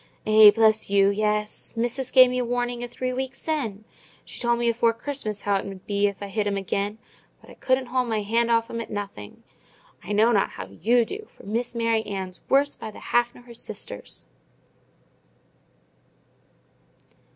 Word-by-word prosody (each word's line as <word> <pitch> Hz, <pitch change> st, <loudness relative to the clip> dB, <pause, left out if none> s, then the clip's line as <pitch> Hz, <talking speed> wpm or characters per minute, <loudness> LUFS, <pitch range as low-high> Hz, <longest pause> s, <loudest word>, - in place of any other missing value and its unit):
"Eh, 215 Hz, 0 st, +9 dB
bless 220 Hz, 0 st, +3 dB
you, 200 Hz, 0 st, +4 dB
yes! 210 Hz, +2 st, -2 dB
Missis 245 Hz, +2 st, -2 dB
gave 255 Hz, -1 st, +7 dB
me 250 Hz, 0 st, 0 dB
warning 245 Hz, 0 st, -2 dB
a -, -, -3 dB
three 255 Hz, +1 st, -4 dB
wik 265 Hz, +1 st, -3 dB
sin". 245 Hz, -11 st, -3 dB, 0.4 s
She -, -, -10 dB
told 240 Hz, -1 st, +1 dB
me 240 Hz, 0 st, 0 dB
afore 230 Hz, 0 st, +2 dB
Christmas 230 Hz, -5 st, -4 dB
how 200 Hz, -1 st, +2 dB
it -, -, -4 dB
mud 195 Hz, -2 st, -9 dB
be, 205 Hz, 0 st, +1 dB
if 200 Hz, 0 st, -5 dB
I -, -, -4 dB
hit 205 Hz, +1 st, -1 dB
'em 200 Hz, -1 st, 0 dB
again; 200 Hz, +2 st, -2 dB, 0.4 s
but -, -, -16 dB
I -, -, -11 dB
couldn't 260 Hz, 0 st, 0 dB
hold 250 Hz, 0 st, -1 dB
my 215 Hz, -2 st, 0 dB
hand 230 Hz, +3 st, +1 dB
off 230 Hz, 0 st, +2 dB
'em 230 Hz, -, -3 dB
at -, -, -8 dB
nothing. 200 Hz, -, -7 dB, 0.6 s
I 205 Hz, -, -7 dB
know 215 Hz, +3 st, +4 dB
not 205 Hz, -4 st, +2 dB
how 90 Hz, -, -6 dB
you 225 Hz, -, +1 dB
do, 425 Hz, -, -7 dB
for -, -, -15 dB
Miss 235 Hz, +4 st, -2 dB
Mary 230 Hz, -1 st, +1 dB
Ann's 190 Hz, -2 st, -5 dB
worse 280 Hz, +1 st, +3 dB
by 220 Hz, -, -7 dB
the 215 Hz, -, -11 dB
half 240 Hz, 0 st, +3 dB
nor 245 Hz, -, -14 dB
her 240 Hz, -1 st, -13 dB
sisters!" 215 Hz, -, -7 dB
225 Hz, 185 wpm, -25 LUFS, 205-245 Hz, 0.6 s, Eh